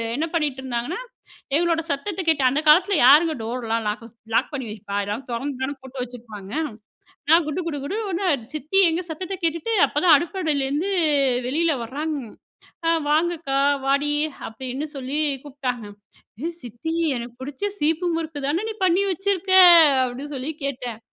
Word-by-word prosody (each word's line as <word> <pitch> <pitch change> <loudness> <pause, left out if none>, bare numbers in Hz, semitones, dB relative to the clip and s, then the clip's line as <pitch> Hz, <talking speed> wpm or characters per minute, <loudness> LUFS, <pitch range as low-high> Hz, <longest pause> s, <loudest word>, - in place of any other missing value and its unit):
என்ன 305 +5 0
பண்ணீட்டுருந்தாங்கன்னா, 265 - -2 0.6
எங்களோட 335 0 +2
சத்தத்த 330 +7 -2
கேட்டு 300 -5 +3
அந்த 290 +4 0
காலத்தில 370 +6 +6
யாருங்க 315 +5 +7
டோர்லாம் 230 -1 -2
லாக்கூஸ் 230 +2 -5 0.2
லாக் - - +2
பண்ணி 265 -3 -4
வைப்பா? 200 -1 -7
எல்லாரும் 210 +6 -5
தொறந்து 260 +2 -4
தான 280 +2 -2
போட்டு 265 0 -7
வச்சிருப்பாங்க. 225 -5 -10 0.8
நான் 330 +1 +6
குடு 310 +4 -2
குடு 290 - -3
குடுன்னு 415 +7 -3
ஒடுனேன், 345 - 0
சித்தி 310 +6 +1
எங்க 330 +3 -1
சத்தத்த 370 +4 -5
கேட்டுட்டு, 335 +7 0
அப்பதான் 310 +1 +5
அடுப்படியிலேருந்து 310 -1 -1 0.6
வெளியில 320 +2 +1
வராங்க. 295 +5 -3 0.7
"ஆ! - - +4 0.2
வாங்க 325 +3 +3
அக்கா, 275 -4 -1 0.3
வாடி" 280 +2 +2 0.4
அப்படீன்னு 260 +6 -5
சொல்லி 275 +2 -3 0.3
கூப்ட்டாங்க. 255 -6 -4 0.6
"ஏ 335 - 0
சித்தி! 245 +8 -5 0.2
எனக்கு 235 0 -7
புடிச்ச 275 +6 -6 0.2
சீப்பு 325 +4 +1
முறுக்கு 320 -2 -4
தான 330 +8 0
நீ 440 - -4
பண்ணி 370 +1 +3
வச்சுருக்க?" 385 +1 -1 0.5
அப்படீன்னு 260 +4 -6
சொல்லி 265 +3 -4
கேட்டேன். 245 -5 -4
290 Hz, 145 wpm, -23 LUFS, 255-330 Hz, 0.8 s, யாருங்க